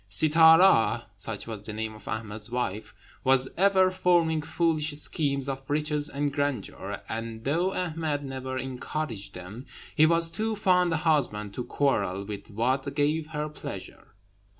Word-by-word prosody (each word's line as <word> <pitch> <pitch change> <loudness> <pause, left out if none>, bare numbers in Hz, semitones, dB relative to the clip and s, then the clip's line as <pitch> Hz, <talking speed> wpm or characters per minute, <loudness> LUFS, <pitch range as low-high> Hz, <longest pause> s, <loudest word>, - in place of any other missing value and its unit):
Sittâra, 160 - +5
such 100 +1 -3
was 110 -3 -6
the 105 +1 -4
name 110 0 -4
of 105 - -14
Ahmed's 105 0 -4
wife, 105 -4 -3 0.3
was 130 0 +4
ever 190 0 +4
forming 170 -4 +2
foolish 155 -1 0
schemes 140 -2 +1
of 135 -1 -3
riches 150 0 +1
and 145 0 -2
grandeur; 145 -7 -3
and 115 0 -5
though 170 +8 +1
Ahmed 160 -5 -2
never 130 -1 -5
encouraged 125 -5 -4
them, 100 +8 -9 0.3
he 155 - +6
was 165 0 +3
too 220 +6 -1
fond 180 -3 +2
a 165 - +1
husband 135 - 0
to 125 - -4
quarrel 100 -9 0
with 100 +1 -7
what 125 +6 -1
gave 150 +2 +1
her 150 -1 -3
pleasure. 150 -8 -9
140 Hz, 150 wpm, -27 LUFS, 110-160 Hz, 0.3 s, he